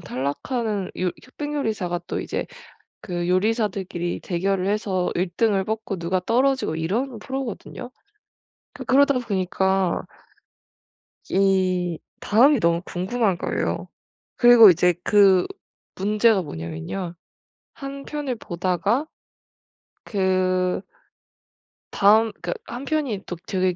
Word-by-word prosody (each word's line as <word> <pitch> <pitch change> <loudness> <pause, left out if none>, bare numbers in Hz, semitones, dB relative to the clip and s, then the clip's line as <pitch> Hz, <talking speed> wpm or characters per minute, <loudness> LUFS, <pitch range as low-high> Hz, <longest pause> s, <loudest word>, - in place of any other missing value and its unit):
탈락하는 200 - -3
요 180 -1 +1
흑백 290 +3 -6
요리사가 205 -11 -2
또 - - -2
이제 - - -3 0.5
그 175 -1 -3
요리사들끼리 190 -3 0
대결을 185 +1 -1
해서 200 -3 0
1 180 0 -1
등을 205 -4 +2
뽑고 220 -2 -3
누가 180 +2 -1
떨어지고 255 - +1
이런 225 +10 -2
프로거든요. 260 0 -6 0.8
그 260 - -8
그러다 280 +2 +4
보니까 190 -4 0 1.3
이 185 -3 +1 0.2
다음이 250 +5 +4
너무 170 -1 +2
궁금한 190 +2 -1
거예요. - - -2 0.5
그리고 240 -4 +9
이제 175 +1 +3
그 195 -3 +5 0.5
문제가 210 +1 +2
뭐냐면요. 85 - -5 0.6
1 275 -1 -8
편을 290 -4 -3
보다가 195 - -1 1.0
그 185 -2 +1 1.1
다음 215 +2 +4
그 175 -1 -2
1 245 +3 -7
편이 275 -10 -1
또 180 - -5
되게 185 -2 0
195 Hz, 225 characters per minute, -23 LUFS, 180-235 Hz, 1.3 s, 그리고